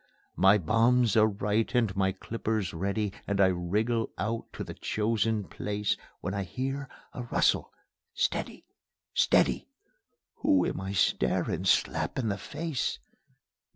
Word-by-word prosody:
My 95 +3 +6
bombs 115 +5 +3
are 110 -1 +6
right 105 +1 0
and 115 -6 +2
my 95 -1 +2
clippers 110 0 -3
ready, 100 +4 -1
And 100 -1 -1
I 95 -1 +6
wriggle 105 +6 0
out 110 +3 -3
to - - -5
the - - -7
chosen 110 0 0
place, 105 +1 -2 0.3
When 95 - -3
I 100 - -1
hear 135 +7 -4 0.2
a - - -5
rustle... 120 - +1 0.4
Steady!... - - -2 0.5
Steady! - - +3 0.7
Who 95 -2 +3
am - - -2
I 95 +1 -4
staring 65 -8 +1
slap - - +1
in 120 -5 0
the 100 0 -2
face? 160 -7 -3
105 Hz, 135 wpm, -29 LUFS, 95-115 Hz, 0.7 s, My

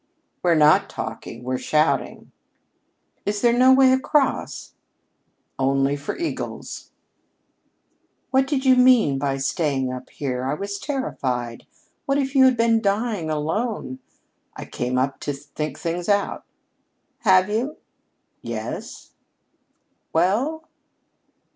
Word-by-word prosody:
"We're 175 -2 +3
not 150 -1 +5
talking. 115 +2 -7
We're 130 0 -2
shouting." 155 +1 0 0.9
"Is 205 0 -2
there 235 -1 +4
no 255 +2 +5
way 260 0 +6
across?" 270 +2 0 0.9
"Only 135 +1 +2
for 140 0 -5
eagles." 340 - -5 1.4
"What 265 0 +3
did 270 -2 -1
you 260 -1 +6
mean 250 - +5
by 135 -1 -1
staying 135 -2 -1
up 125 0 -8
here? 130 -3 -4
I 135 +3 -1
was 200 +4 -5
terrified. 125 - -3 0.4
What 275 0 +2
if 270 -1 -1
you 265 -2 +6
had 255 -2 +4
been 230 -1 +3
dying 205 -4 -1
alone 155 - -2 0.3
" - - -46
"I - - -7
came 125 +1 -3
up 130 +1 0
to 145 - -3
think 145 +1 -6
things 170 +2 -3
out." 200 -1 0 0.7
"Have 190 -4 +4
you?" 250 +8 -2 0.6
"Yes." - - -6 1.0
"Well?" 245 - +1
185 Hz, 120 wpm, -23 LUFS, -, 1.4 s, way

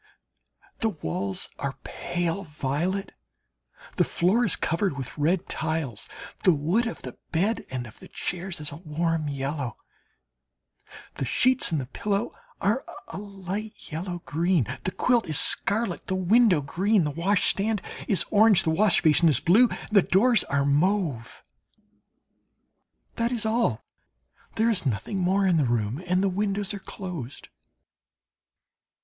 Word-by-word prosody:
The 225 - +1
walls 95 - -3
are - - -3
pale 175 +2 -3
violet, 165 +5 -2 0.9
the - - +5
floor 195 +8 +2
is 210 - +3
covered 170 -2 -1
with 130 -3 -6
red 165 +4 +1
tiles, 155 -8 -3 0.3
the 180 - +5
wood 175 +12 +1
of 230 - -6
the - - -9
bed 200 +8 0
and 125 -2 -4
of 110 - -14
the - - -12
chairs 180 0 -4
is 150 -1 -2
a 145 - -8
warm 165 -1 -1
yellow, 140 -2 -3 1.4
the 135 - -3
sheets 255 - +3
and 160 - +1
the 130 - -4
pillow 205 - -2 0.3
are 215 +7 +1 0.3
a - - -6
light 200 +1 -7
yellow 175 +2 -5
green, 165 +1 +1 0.2
the 185 - 0
quilt 240 +2 +1
is 155 -3 +2
scarlet, 200 -2 +1
the 190 - -1
window 185 -2 +4
green, 190 +8 +1
the 150 - -1
washstand 200 +5 +1 0.3
is 195 - +3
orange, 210 -2 +6
the 160 - +1
wash 195 +3 +4
basin 160 +2 +5
is 150 - +3
blue, 225 +8 +5
and - - -8
the 205 -2 +6
doors 215 +4 +4
are 140 0 0
mauve. 150 - 0 1.7
That 235 +1 0
is 235 -3 -1
all 220 - +1 0.7
there 230 +1 +3
is 195 -5 -1
nothing 135 - -2
more 190 +2 +2
in 180 -3 +3
the 150 - +3
room, 120 +3 -1
and 185 +2 +2
the - - +3
windows 200 +1 -1
are 200 - -5
closed. 170 -10 -7
180 Hz, 145 wpm, -26 LUFS, 150-205 Hz, 1.7 s, orange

